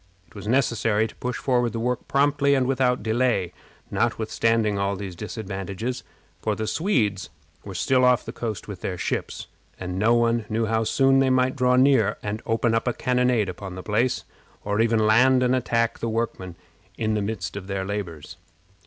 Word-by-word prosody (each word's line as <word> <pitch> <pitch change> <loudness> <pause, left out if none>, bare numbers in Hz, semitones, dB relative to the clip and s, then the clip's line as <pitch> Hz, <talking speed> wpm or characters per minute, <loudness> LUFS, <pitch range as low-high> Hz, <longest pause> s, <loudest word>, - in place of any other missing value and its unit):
It - - -24
was 105 -1 -8
necessary 115 -3 +2
to - - -15
push 125 0 -3
forward 125 -4 +1
the 115 - -3
work 125 +2 -2
promptly 140 0 +2
and 130 -2 +2
without 125 -1 +2
any - - -12
delay, 110 -5 +1 0.4
notwithstanding 115 -3 +1
all 100 0 0
these 95 -2 -6
disadvantages, 105 +3 -5 0.4
for - - -1
the 110 - -3
Swedes 110 - 0 0.3
were 100 -2 -8
still 130 +7 +2
off 125 -2 +4
the - - -5
coast 110 -4 -5
with 100 -4 -8
their 90 - -3
ships, - - -3 0.3
and 90 0 -4
no 115 +3 +4
one 115 -1 +2
knew 110 +1 0
how 110 0 0
soon 135 +3 +3
they 135 -1 +3
might 130 0 +2
draw 125 -1 +3
near 125 -5 +4
and 105 +2 -3
open 115 0 +1
a 115 - +2
cannonade 125 -3 +1
upon 90 +1 -7
the 95 - -7
place, 115 +4 0 0.4
or 105 +1 +1
even 115 -1 +2
land 125 +4 +5
and 125 +1 +3
attack 115 -2 0
the 115 - -2
workmen 110 -6 -3 0.4
in 110 -1 0
the 105 - 0
midst 100 -3 -4
of 100 -2 -6
their 95 -1 -3
labors. 95 -7 -5
115 Hz, 185 wpm, -24 LUFS, 100-125 Hz, 0.4 s, land